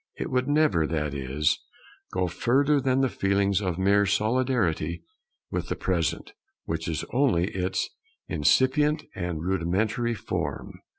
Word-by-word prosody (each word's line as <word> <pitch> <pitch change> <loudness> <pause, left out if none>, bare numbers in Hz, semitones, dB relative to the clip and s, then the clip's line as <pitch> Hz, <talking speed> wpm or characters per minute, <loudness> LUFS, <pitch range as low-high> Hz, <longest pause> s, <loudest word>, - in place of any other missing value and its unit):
It - - -4
would 125 +1 +1
never, 145 - +3
that 75 -3 -2
is, 70 +2 0 0.5
go 90 0 0
further 135 - +2
than 130 0 +2
the 135 - +3
feelings 100 -2 +1
of 90 -4 -2
mere 100 +2 +3
solidarity 105 - 0 0.5
with - - -3
the - - -1
Present, - - -1 0.3
which 80 0 -3
is 80 -2 -2
only 120 -9 +2
its 95 0 -1 0.4
incipient 150 +3 +2
and 85 -4 -4
rudimentary 100 +6 0
form. - - -4
100 Hz, 130 wpm, -26 LUFS, 85-130 Hz, 0.5 s, never